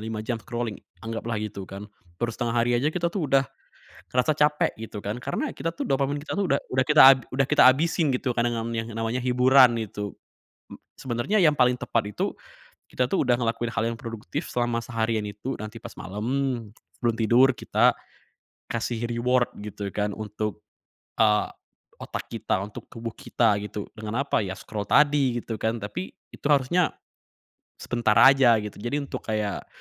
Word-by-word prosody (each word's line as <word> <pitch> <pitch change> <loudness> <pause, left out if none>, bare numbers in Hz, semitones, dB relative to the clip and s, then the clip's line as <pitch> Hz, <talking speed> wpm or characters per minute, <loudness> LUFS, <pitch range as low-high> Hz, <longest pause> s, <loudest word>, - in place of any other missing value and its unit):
5 110 0 -5
jam 115 -1 -3
scrolling 120 0 -4 0.2
anggaplah 115 0 -3
gitu 105 -3 -5
kan. 100 +2 -8 0.3
Baru 115 +2 -2
setengah 120 0 -2
hari 120 +1 +2
aja 125 +5 +2
kita 170 +1 -1
tuh 165 -8 -2
udah 135 0 +4 0.7
ngerasa 130 +4 +2
capek 150 0 +2
gitu 110 -1 -7
kan, 105 +3 -4
karena 135 +3 -3
kita 165 - -2
tuh 165 - -5
dopamin 140 +1 0
kita 155 - -5
udah 180 -9 +1 0.2
kita 135 -4 +7
udah 135 0 +2
kita 150 - +5
habisin 155 0 0
gitu 125 -1 -1
kadang-kadang 115 -1 0
yang 115 +1 -3
namanya 115 +2 -2
hiburan 125 -1 +5
itu. 105 -1 -5 0.6
Mmm, - - -13 0.2
sebenarnya 130 - -1
yang 160 -6 +5
paling 125 -2 +3
tepat 110 -4 -1
itu, - - -1 0.5
kita 125 0 -1
tuh 185 -9 +1
udah 120 - +4
ngelakuin 115 -1 -2
hal 105 - 0
yang 115 - -6
produktif 115 +7 -5
selama 120 -1 0
seharian 115 -2 -1
itu, 105 +6 -5
nanti 110 +1 -8
pas - - -8
malem 120 +3 -2 0.3
sebelum 120 -1 +2
tidur 120 +4 +5
kita - - +3 0.8
kasih 115 0 -2
reward 120 +1 +1
gitu 100 -1 -6
kan 105 -1 -2
untuk, 105 -1 -5 0.5
eee, 105 -1 +3 0.5
otak - - -6
kita, 95 - -1
untuk 105 +1 -9
tubuh 115 0 -6
kita 110 -2 +1
gitu. 105 0 -6
Dengan 110 +4 -2
apa? 140 - 0
Ya 95 -3 -2
scroll 105 +1 -6
tadi 140 -4 +3
gitu 110 -2 -5
kan, 110 0 -2
tapi 175 - -5 0.2
itu - - -9
harusnya 150 +4 +2 0.9
sebentar 120 -3 +1
aja 135 -1 +7
gitu. 105 -1 -8
Jadi 120 +7 -2
untuk 140 - -7
kayak, 105 -2 -2
120 Hz, 165 wpm, -25 LUFS, 110-135 Hz, 0.9 s, kita